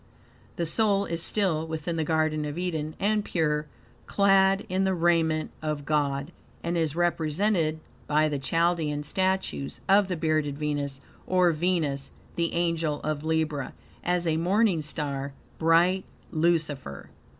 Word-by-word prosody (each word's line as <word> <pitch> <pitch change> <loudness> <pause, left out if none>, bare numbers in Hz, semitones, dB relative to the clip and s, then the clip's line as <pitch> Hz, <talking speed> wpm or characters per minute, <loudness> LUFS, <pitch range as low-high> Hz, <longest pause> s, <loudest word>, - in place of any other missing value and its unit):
The 170 - -1
soul 200 +3 +2
is 170 -2 -3
still 170 -5 0
within 160 +1 -3
the 160 - 0
Garden 155 -1 +1
of 150 +1 -4
Eden 160 -4 -2
and 210 +1 +1
pure, 150 -5 0 0.4
clad 195 0 +4
in 185 +1 0
the 190 -1 +1
raiment 165 -2 +2
of 150 -2 -3
God, 145 0 0 0.3
and 170 +1 -1
is 160 -3 0
represented 170 0 +1 0.3
by 155 +1 +3
the 145 -2 -2
Chaldean 160 0 0
statues 185 - -1
of 200 0 +5
"The 180 -2 -2
Bearded 155 -3 0
Venus," 145 -2 -2 0.3
or 180 -1 +4
Venus, 155 -4 -1 0.3
the 170 -1 0
Angel 165 -3 0
of 155 -1 -2
Libra, 160 -3 -1 0.3
as 175 0 0
a 160 -1 +1
morning 185 +1 +2
star, 140 -2 -4 0.3
bright 170 +3 +4 0.3
Lucifer. 155 - -1
160 Hz, 140 wpm, -27 LUFS, 150-175 Hz, 0.4 s, of